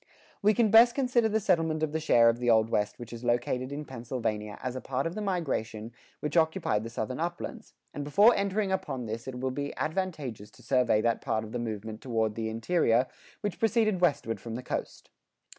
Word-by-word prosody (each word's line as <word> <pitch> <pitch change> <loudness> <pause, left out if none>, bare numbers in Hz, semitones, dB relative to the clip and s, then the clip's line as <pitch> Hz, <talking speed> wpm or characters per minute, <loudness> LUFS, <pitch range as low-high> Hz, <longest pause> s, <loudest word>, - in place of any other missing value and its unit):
We 210 +1 +4
can 230 -4 +3
best 235 +2 +7
consider 250 -4 +2
the 220 +1 +1
settlement 165 -5 +1
of 155 - 0
the 160 - -1
share 120 -7 +5
of 115 0 +3
the 120 -1 0
Old 110 0 +4
West 105 0 0
which 120 -1 -9
is 115 +1 -8
located 125 +2 0
in 150 +1 -5
Pennsylvania 115 -4 -4
as 125 0 -3
a 130 - -4
part 135 +1 -2
of 165 - -2
the 215 - -4
migration 125 - -2 0.3
which 150 - -3
occupied 160 - +2
the 115 - -5
Southern 120 +3 -4
Uplands, 175 +1 -5 0.2
and 145 - -4
before 200 +11 +6
entering 200 0 0
upon 185 -10 -2
this 115 +2 -5
it 125 -1 -5
will 130 0 -1
be 140 +2 -4
advantageous 155 - -3
to 125 - -19
survey 125 -3 +3
that 115 0 +1
part 110 - -1
of 110 - -9
the 120 - -3
movement 110 -1 -5
toward 110 -4 0
the 110 0 -3
interior 115 +1 +2 0.4
which 205 -3 -3
proceeded 220 -4 +2
westward 140 - +1
from 115 +1 -6
the 125 - -5
coast. - - -5
130 Hz, 210 wpm, -29 LUFS, 115-180 Hz, 0.4 s, best